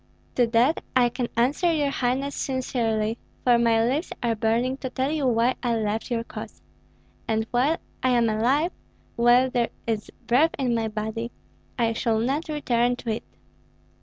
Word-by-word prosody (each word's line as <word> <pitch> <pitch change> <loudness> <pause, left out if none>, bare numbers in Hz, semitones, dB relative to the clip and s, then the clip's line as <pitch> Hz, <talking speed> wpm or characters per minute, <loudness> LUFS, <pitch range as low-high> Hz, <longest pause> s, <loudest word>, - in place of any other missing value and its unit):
"To 245 -2 +3
that 240 +7 +2
I 245 -1 +5
can 245 0 -3
answer 285 +9 +2
your 295 -3 +1
highness 270 +2 -1
sincerely, 230 -4 -1 0.2
for 240 -2 +5
my 230 -1 +3
lips 280 +8 -1
are 235 -1 +2
burning 230 +4 0
to 260 - -5
tell 265 +2 -1
you 300 -4 0
why 240 +1 +3
I 240 -2 +1
left 220 +1 -2
your 235 -2 -1
cause; - - -9 0.7
and 220 0 0
while 270 +7 +2 0.2
I 255 - +2
am 240 -2 +3
alive, 255 +10 +2 0.4
while 245 +2 +4
there 240 -2 +1 0.2
is 220 -2 -2 0.2
breath 290 +7 +3
in 255 -3 0
my 225 -1 0
body, 220 +2 -4 0.5
I 230 -2 +2
shall 225 0 0
not 275 +8 -1
return 245 -5 +1
to 235 -2 -4
it. 220 - -3
240 Hz, 165 wpm, -25 LUFS, 230-260 Hz, 0.7 s, I